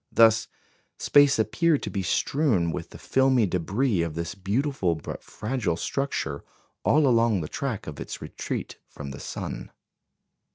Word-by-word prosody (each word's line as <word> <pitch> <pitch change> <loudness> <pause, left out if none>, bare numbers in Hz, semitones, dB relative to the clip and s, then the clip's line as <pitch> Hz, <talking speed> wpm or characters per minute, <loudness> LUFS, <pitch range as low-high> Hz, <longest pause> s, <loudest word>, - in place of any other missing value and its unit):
Thus 115 0 +5 0.5
space 145 -1 +5
appeared 155 +7 +2
to - - -3
be 100 - -1
strewn 95 - +1
with - - -5
the - - -11
filmy 130 -3 +3
débris 95 +3 0
of 80 -2 -4
this 85 0 -3
beautiful 100 - 0
but 80 - -7
fragile 110 -6 -2
structure 85 - -2 0.4
all 150 0 +4
along 115 -6 +3
the 75 - -4
track 130 - -3
of 75 - -7
its - - -6
retreat - - -5
from 70 -2 -8
the 70 - -8
sun. - - -5
110 Hz, 150 wpm, -26 LUFS, 85-135 Hz, 0.5 s, Thus